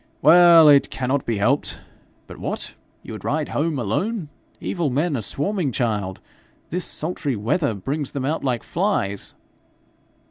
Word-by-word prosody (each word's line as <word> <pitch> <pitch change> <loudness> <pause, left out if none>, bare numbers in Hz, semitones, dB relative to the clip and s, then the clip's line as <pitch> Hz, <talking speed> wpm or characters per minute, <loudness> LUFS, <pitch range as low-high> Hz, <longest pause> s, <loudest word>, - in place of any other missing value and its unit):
Well, 170 -2 +8
it 140 -2 +6
cannot 130 +1 -2
be 115 -2 0
helped. 130 +8 +1 0.5
But - - -12
what! - - -4 0.3
you - - -8
would - - -8
ride - - -1
home 155 0 -1
alone! 155 - -2 0.3
Evil 170 -6 -2
men 145 +4 0
are 120 - -2
swarming, 150 - -2
child. 105 -6 -2 0.5
This 180 +1 -1
sultry 155 -4 -3
weather 120 - 0
brings 140 +8 -3
them 135 -2 -4
out 155 +4 -1
like 125 -4 -1
flies.' 160 - -2
140 Hz, 145 wpm, -22 LUFS, 120-165 Hz, 0.5 s, Well